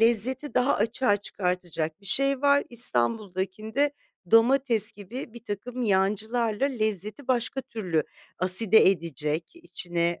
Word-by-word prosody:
lezzeti 240 +5 +3
daha 255 +3 +2
açığa 225 0 +1
çıkartacak 180 -4 -4
bir 200 - -16
şey 275 +5 +1
var. 285 0 +4
İstanbul'dakinde 215 - -1 0.4
domates 230 -2 +4
gibi 220 +4 -9
birtakım 235 +2 -6
yancılarla 215 +4 0
lezzeti 215 - -4
başka 255 +1 -1
türlü 185 -11 -2 0.4
aside 190 +3 +5
edecek, 165 -3 -3
içine 175 - -3
220 Hz, 105 wpm, -26 LUFS, 185-250 Hz, 0.4 s, aside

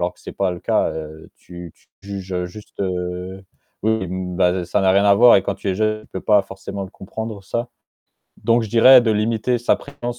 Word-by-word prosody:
alors 90 +1 -1
que - - -24
c'est - - -8
pas 95 -2 -1
le 90 - -8
cas, - - +1
heu, 80 0 -9
tu 85 -2 -11
tu - - -31
juges, 100 -2 -7
heu, 90 0 -2
juste, 105 +4 -13
heu, 90 0 -4 0.4
oui, 110 -2 0
bah, 90 0 -1
ça 105 - 0
n'a 95 -1 +4
rien 100 +1 +3
à 100 -1 +6
voir 120 +2 +7
et 95 - +2
quand 100 - -2
tu - - -5
es - - -1
jeune, 110 +1 -1
tu - - -19
peux 95 - -4
pas 105 -2 +4
forcément 95 +1 -7
le 95 - -11
comprendre, 110 +1 -7
ça. 120 +5 -3 0.8
Donc 115 0 +3
je 110 - -6
dirais 125 +3 +7
de 115 - +1
limiter 110 +3 0
sa 120 - +2
présence 120 0 -7
100 Hz, 230 wpm, -20 LUFS, 90-110 Hz, 0.8 s, voir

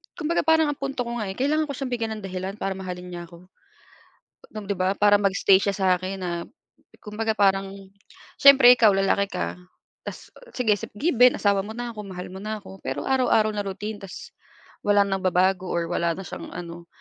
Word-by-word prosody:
kumbaga 335 -2 -1
parang 320 -1 +4
ang 290 - -8
punto 275 -2 -3
ko 235 0 -5
nga, 215 - -3
eh, 190 - -5
kailangan 300 +5 0
ko 280 - -4
siyang 265 -1 -5
bigyan 230 -2 -2
ng - - -13
dahilan 190 +1 -5
para 195 -2 -3
mahalin 180 -1 -7
niya 175 -1 -7
ako. 175 +2 -16 1.0
Nung 215 -2 -8
di 200 - -1
ba, 185 +1 +1
para 205 0 +5
mag-stay 195 -1 +4
siya 200 0 -1
sa 190 -1 -1
akin 190 +1 -5
na 180 -1 -3 0.7
kumbaga 220 +1 -2
parang 195 -1 +2 0.7
siyempre 270 -3 +8
ikaw 220 -3 +5
lalaki 195 +1 +1
ka, - - -3 0.5
tas - - -8 0.2
sige, 220 -5 +2 0.2
given 250 0 +4
asawa 200 -1 +1
mo 215 - -7
na 240 +1 -5
ako, 210 - -7
mahal 180 -2 -7
mo 190 - -9
na 215 0 -4
ako, 190 0 -12
pero - - -3
araw-araw 250 -5 +3
na 205 -1 -2
routine 205 +2 -5
tas 195 - -9 0.6
walang 205 -1 +3
nagbabago 185 0 +1
or 170 -1 -2
wala 170 -1 0
na 190 - -7
siyang - - -8
ano 170 0 -8
200 Hz, 195 wpm, -24 LUFS, 190-235 Hz, 1.0 s, siyempre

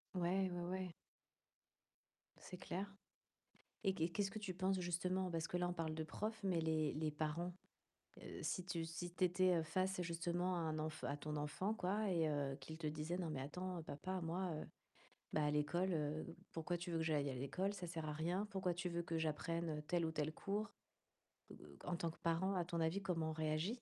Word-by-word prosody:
Ouais, 185 +2 +3
ouais, 175 0 -2
ouais. 185 -2 -2 1.5
C'est 180 - -7
clair, 190 +2 -2 1.0
et 195 -2 +3
qu'est 165 -1 +2
qu'est-ce 195 +2 +1
que 215 - -4
tu 195 -4 -3
penses, 190 0 +2
justement, 180 +1 +1
parce 165 -1 0
que 180 - 0
là 175 0 +2
on - - 0
parle 165 -2 -1
de 160 0 -1
profs, 220 +5 -2
mais 185 -4 +3
les 160 -2 +2
les 155 0 +1
parents, 155 +4 -1 0.7
heu, - - -6
si 185 -2 0
tu 170 -3 -1
si 170 +2 -4
tu 185 - +1
étais 180 -2 +5
face, 185 +3 +1
justement, 175 +2 +1
à - - +1
un 155 -1 0
enf 155 0 -2
à 145 - 0
ton 150 +1 -3
enfant, 170 +8 0
quoi 205 +1 +1
et 165 -3 +4
heu, 140 -2 +1
qu'il 160 0 -7
te 155 - -1
disait: 155 +4 -1
«Non 170 -3 0
mais 140 -4 -1
attends 180 +5 -3
papa 185 +5 -3
moi, 175 +2 0 0.8
bah, 155 - +3
à 150 - +4
l'école, 175 +5 +2
heu, 155 +2 -1 0.2
pourquoi 165 +2 0
tu 175 +1 -4
veux 165 - +1
que 160 - +1
j'aille 145 -3 +2
à - - -2
l'école? 160 +10 0
Ça 180 -3 -4
sert 160 -2 -3
à - - 0
rien. 175 +7 +1
Pourquoi 190 -3 +1
tu 180 +1 -1
veux 170 0 0
que 165 -1 -1
j'apprenne 160 0 0
tel 175 -2 +3
ou - - 0
tel 155 0 0
cours?» 205 +5 -1 0.8
B - - -9
heu - - -11
heu, - - -12
en 180 - +1
tant 170 -1 0
que - - -16
parent 170 +4 +2
à 175 -2 +2
ton 170 -1 -1
avis 165 +5 +2
comment 165 -4 +1
on - - -2
réagit? 155 +2 +1
170 Hz, 215 wpm, -42 LUFS, 155-185 Hz, 1.5 s, étais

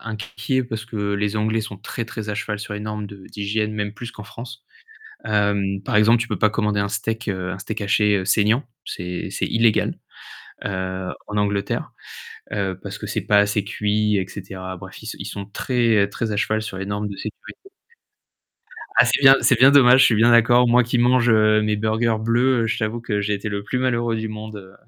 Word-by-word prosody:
inquiet 110 +3 -3
parce 110 -2 -5
que 105 -3 -3
les 105 +1 -1
Anglais 110 +1 0
sont 105 -2 -7
très, 115 +4 -5
très 110 -1 -7
à 105 - -2
cheval 105 0 -3
sur 105 0 -6
les 105 - -5
normes 105 0 -4
de 100 - -11
d'hygiène, 105 +1 -2
même 105 -1 -3
plus 120 +2 -7
qu'en 105 - -11
France. 120 +3 -10 0.6
Hem, 100 -2 0
par 105 - -2
exemple, 110 +3 +5
tu 115 - -2
peux 105 -5 -3
pas 110 - +3
commander 105 -2 0
un 100 - -1
steak, 110 +3 -3
heu, 95 -2 -3
un 95 - -5
steak 105 +2 -5
haché 105 -1 +2
saignant, 110 +6 +2 0.2
c'est 90 0 -5
c'est - - -2
illégal, 115 -1 +2 0.7
heu, 95 -1 -3 0.2
en 105 - -4
Angleterre, 100 -1 -1 0.6
heu, 95 -3 -2
parce 100 0 -7
que 105 - -6
c'est 105 - -2
pas 105 - +2
assez 105 0 +2
cuit 105 0 0
et 95 -2 -1
cetera. 95 -1 -7
Bref, - - -11
ils - - -10
s - - -6
ils - - -6
sont 100 - -6
sont - - -10
très, 115 -5 +2
très 110 +2 -3
à - - -2
cheval 110 +1 0
sur 95 -3 -6
les 95 - -4
normes 105 +1 -3
de 100 - -7
sécurité. 110 - -8 1.4
Ah - - +8
c'est - - +1
bien 135 0 +8
c'est 130 - +4
bien 135 +3 +8
dommage, 130 -2 +7
je - - +8
suis 115 - +3
bien 115 +2 +5
d'accord. 120 +1 +5
Moi 125 +1 +5
qui 120 +1 -1
mange, 125 0 +3
heu, 110 -1 +4
mes 105 0 0
burgers 110 +1 +1
bleus, 120 +2 +2
heu, - - 0
je 110 - -1
t'avoue 110 +1 -2
que 105 -3 -2
j'ai 105 +1 -1
été 100 +1 -4
le 100 -1 -3
plus 125 +5 -2
malheureux 120 -3 0
du 110 0 -3
monde, 110 0 -7
heu, 95 -1 -12
105 Hz, 220 wpm, -22 LUFS, 100-115 Hz, 1.4 s, Ah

